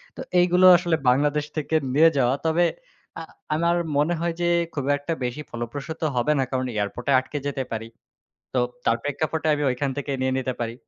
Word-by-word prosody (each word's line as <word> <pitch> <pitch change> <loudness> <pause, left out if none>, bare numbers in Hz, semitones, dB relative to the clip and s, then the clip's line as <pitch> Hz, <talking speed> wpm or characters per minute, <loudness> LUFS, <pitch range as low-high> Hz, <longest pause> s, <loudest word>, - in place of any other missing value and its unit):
তো - - -7 0.2
এইগুলো 180 +1 +4
আসলে 170 -2 0
বাংলাদেশ 145 +3 +2
থেকে 155 +1 -1 0.2
নিয়ে 160 +4 +6
যাওয়া। 130 0 +3
তবে 165 +2 +3 0.5
আ - - -6 0.3
আমার 170 +2 +2 0.2
মনে 150 +4 +2
হয় 170 0 -1
যে - - +1 0.3
খুব 140 -3 -3
একটা 145 +4 -3
বেশি 125 +5 -3
ফলপ্রসূত 135 +7 -6
হবে 125 +5 +1
না, - - +3
কারণ 130 -1 -1
এয়ারপোর্টে 105 +6 -2
আটকে 130 +3 -6
যেতে 135 -2 -2
পারি। 115 0 -4 0.7
তো - - 0 0.3
তার 115 - +3
প্রেক্ষাপটে 155 +2 -2
আমি 150 0 -1
ওইখান 130 +3 -1
থেকে 145 0 -3
নিয়ে 130 0 +1
নিতে 130 -1 -2
পারি। 115 -1 -3
145 Hz, 180 wpm, -24 LUFS, 130-160 Hz, 0.7 s, নিয়ে